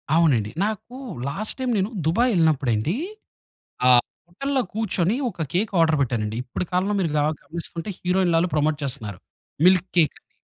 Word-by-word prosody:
అవునండి. 125 -11 +3
నాకు 220 +3 -4 0.3
last 205 +10 -3
time 255 -1 0
నేను 195 +3 +1 0.2
దుబాయ్ 235 +10 +3
యెళ్ళినప్పుడండీ, 150 - +2 0.9
ఆహ్, 120 -1 +7 0.2
హోటల్‌లో 270 +9 -1
కూర్చొని, 205 -2 0
ఒక 165 -5 -4
కేక్ 205 +4 +1
ఆర్డర్ 160 -1 +4
పెట్టానండి, 115 -3 -1
ఇప్పడి 130 +8 -4
కాలంలో 190 +3 +1
మీరు 170 -4 +1
గ - - +2 0.2
గమనిస్తుంటే, 170 +2 -6
హీరోయిన్లు 180 -2 +2
ఆల్లు 175 0 0
ప్రమోట్ 150 0 +1
చేస్తున్నారు. 105 -8 -5 0.5
మిల్క్‌కేక్ 180 -4 +3
అని. - - -59
170 Hz, 145 wpm, -23 LUFS, 145-195 Hz, 0.9 s, ఆహ్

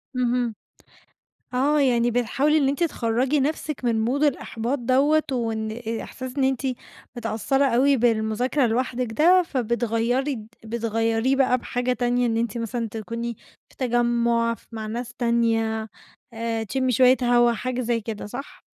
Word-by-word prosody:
اهم، 245 -2 0 1.0
آه، 285 +4 +2
يعني 240 -3 +3
بتحاولي 270 +6 +2
إن 280 -3 +3
أنتِ 285 +5 0
تخَرّجي 255 -1 0
نَفْسِك 300 0 -2
من 225 -2 +1
mood 275 +5 0
الإحباط 260 -2 -1
دوّة، 275 +6 +3
وإن 225 -3 -2
آآ 225 0 -4
إحساس 260 +1 -8
إن 275 - +2
أنتِ 265 -2 +1 0.6
متأثرة 235 +4 0
أوي 270 +2 +3
بالمذاكرة 235 +3 +1
لوحدِك 245 0 -1
ده، 355 +8 +5
فبتغيّري 240 0 -1 0.2
فبتغيّريه 225 +2 0
بَقى 260 -2 +3
بحاجة 245 +1 -1
تانية، 245 0 +1
إن 225 -1 0
أنتِ 230 0 -1
مثلًا 230 0 -3
تكوني 230 +2 -5 0.3
في - - -23
تجمُّع، 235 -2 +1
ف - - -15
مع 220 -1 -5
ناس 240 +2 -5
تانية، 225 -2 0 0.4
آآ 225 0 -2
تشمي 260 +4 -1
شوية 255 +2 +5
هوا، 240 0 +4
حاجة 250 +4 -3
زي 235 -1 0
كده، 215 -1 -6
صح؟ 245 +7 -8
240 Hz, 145 wpm, -24 LUFS, 230-260 Hz, 1.0 s, ده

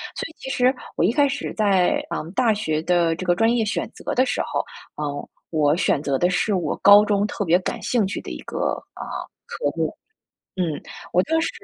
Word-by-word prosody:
所 - - -3
以 325 - -14
其 265 - -7
实 255 -1 +3 0.2
我 - - +2
一 185 - +4
开 290 +1 +4
始 275 +1 -4
在， 200 +5 +2
嗯， 160 - -4
大 230 0 +3
学 155 -7 -1
的 170 -1 +2
这 185 - -6
个 175 0 +3
专 225 +5 +3
业 235 - +2
选 215 - -2
择 - - -4
的 255 - +3
时 - - -1
候， - - -1 0.4
呃， 145 -1 -4 0.2
我 150 -2 +3
选 145 - +1
择 140 -2 +1
的 175 +6 +2
是 200 +4 +1
我 180 - -1
高 205 +1 +8
中 205 -1 +2
特 205 - -3
别 170 +1 +5
感 185 - -4
兴 235 -5 +1
趣 195 - -3
的 - - -8
一 - - -6
个， - - -7 0.4
呃， - - -6 0.4
科 480 - -6
目， - - -1 0.6
嗯， 165 -5 -1 0.3
我 180 - +4
当 325 0 +1
时 - - 0
195 Hz, 235 characters per minute, -23 LUFS, 170-230 Hz, 0.6 s, 高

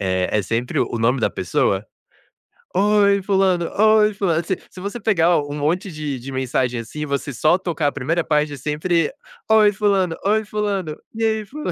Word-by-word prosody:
eh, 95 -1 0
é 105 - +2
sempre 115 +5 -2
o 120 - -1
nome 120 +3 +1
da - - +1
pessoa. - - 0 0.9
"Oi 200 0 +3
fulano, 190 -3 +1
oi 215 0 +5
fulano". 175 -5 0
Se 190 - -1
se - - -12
você 205 +5 -5
pegar 175 -6 +3
um 145 0 -5
monte 170 +7 -1
de 150 -4 -4
de 135 +3 -8
mensagem 130 -2 -1
assim, 135 +7 -8
e 150 - -1
você 140 0 -3
só 155 +9 +3
tocar 170 -5 -2
a 145 - +1
1º 160 +5 -1
parte 150 -1 0
é - - -7
sempre: 155 +4 0 0.4
"Oi 215 -1 +6
fulano, 195 -4 +1
oi 215 +2 +2
fulano, 200 -7 -2 0.2
e 225 - -2
aí 220 -1 0
fula" 300 +8 -5
170 Hz, 190 wpm, -21 LUFS, 145-200 Hz, 0.9 s, Oi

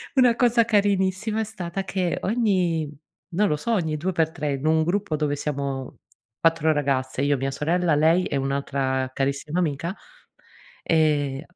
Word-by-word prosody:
una 250 -3 +5
cosa 235 -1 +3
carinissima 205 0 +1
è - - +1
stata 195 -3 -5
che 185 -3 -1
ogni, 185 -8 +1 0.5
non 210 +3 +3
lo 150 - +1
so, 190 +11 -3
ogni 160 -7 0
due 180 +5 -1
per 160 -2 +1
tre, 150 -2 -3
in 135 +2 -4
un 160 0 +3
gruppo 180 0 -1
dove 150 -1 0
siamo 140 -3 -4 0.5
4 165 -1 +3
ragazze, 135 -3 -1
io 140 0 +2
mia 135 +1 -2
sorella, 165 +3 +1
lei 160 +5 +3
è - - -3
un'altra 135 -1 -1
carissima 140 +5 -1
amica, 165 +2 -2 0.9
ehm, 145 -4 +1
160 Hz, 155 wpm, -24 LUFS, 140-190 Hz, 0.9 s, una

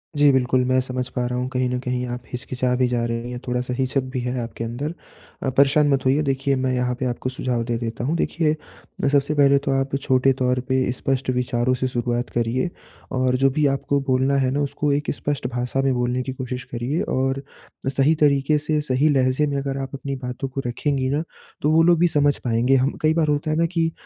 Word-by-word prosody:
जी, 145 -1 +5
बिल्कुल, 130 -1 +2
मैं 130 +1 +3
समझ 125 0 -3
पा 125 - 0
रहा 125 0 -2
हूँ 125 0 -1
कहीं 125 0 +1
न 125 - -1
कहीं 125 0 -1
आप 120 0 -5
हिच-किचा 125 0 -2
भी 125 0 +2
जा 120 -1 0
रही 115 +1 -3
हैं, 120 - -5
थोड़ा-सा 125 0 -1
हिचक 130 +1 +1
भी 130 - -1
है 125 +1 -2
आपके 115 0 -6
अंदर। 130 +8 -4 0.5
अ, - - +1
परेशान 145 +2 +5
मत 135 -1 0
होइए 135 +4 +3
देखिए 135 0 0
मैं 130 -1 0
यहाँ 125 0 0
पे 130 - -1
आपको 125 +1 -2
सुझाव 125 -2 -2
दे 120 0 -1
देता 115 0 -4
हूँ, 150 +6 0
देखिए 160 -2 +1 0.5
ब - - +2
सबसे 145 +1 +2
पहले 140 -1 +5
तो 135 - +1
आप 135 0 -1
छोटे 130 0 +3
तौर 125 -1 0
पे 130 -1 +2
स्पष्ट 130 +1 -2
विचारों 125 0 +1
से 130 +1 -1
शुरुआत 120 0 -2
करिए 120 +8 0 0.4
और 130 0 +1
जो 135 +1 +4
भी 150 +2 +1
आपको 140 +1 0
बोलना 130 +2 +2
है 130 -1 +1
ना 140 - 0
उसको 145 +1 -1
एक 145 +1 0
स्पष्ट 145 -1 -2
भाषा 125 +2 -1
में 135 -1 +2
बोलने 125 +1 0
की 130 0 -4
कोशिश 125 -1 -5
करिए 125 +7 -1
और 135 +1 0 0.5
सही 140 +4 +3
तरीके 145 0 +3
से 150 +1 0
सही 145 +2 +2
लहजे 130 +1 +2
में 140 -1 -1
अगर 135 0 -2
आप 135 - -4
अपनी 140 0 -4
बातों 130 +1 -5
को 135 +1 -4
रखेंगी 130 +1 -1
ना, 150 +3 0 0.4
तो 150 - +2
वो 165 +1 +5
लोग 170 -1 +4
भी 175 - +5
समझ 145 -2 +2
पाएँगे 120 +2 +2
हम 135 +2 +2
कई 155 0 +3
बार 160 -1 +1
होता 150 +1 0
है 155 - 0
ना 170 - +3
कि 165 -1 0
130 Hz, 230 wpm, -22 LUFS, 125-140 Hz, 0.5 s, जी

